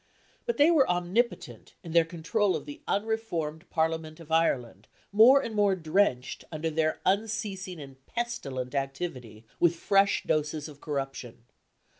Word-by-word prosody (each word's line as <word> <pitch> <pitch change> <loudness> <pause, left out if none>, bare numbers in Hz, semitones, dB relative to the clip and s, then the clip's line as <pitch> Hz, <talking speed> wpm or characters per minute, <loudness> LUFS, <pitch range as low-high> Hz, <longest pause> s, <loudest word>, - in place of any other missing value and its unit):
But 475 - 0
they 295 +4 +6
were 295 -6 +4
omnipotent 180 +7 -1
in 170 - -8
their 165 0 +5
control 180 +5 0
of - - -5
the 290 +2 -9
unreformed. 195 -7 -2
Parliament 160 -1 -1
of 165 -1 -13
Ireland, 140 -8 0 0.2
more 240 +7 +7
and 225 - -5
more 205 -2 +3
drenched, 160 -6 0
under 160 0 -2
their 155 0 0
unceasing 195 -3 -1
and 135 -2 -12
pestilent 140 - -4
activity, 135 -6 -4
with 170 -1 +4
fresh 195 +3 +2
doses 150 0 -1
of 145 -2 -13
corruption. 135 -5 -5
165 Hz, 140 wpm, -28 LUFS, 150-205 Hz, 0.2 s, more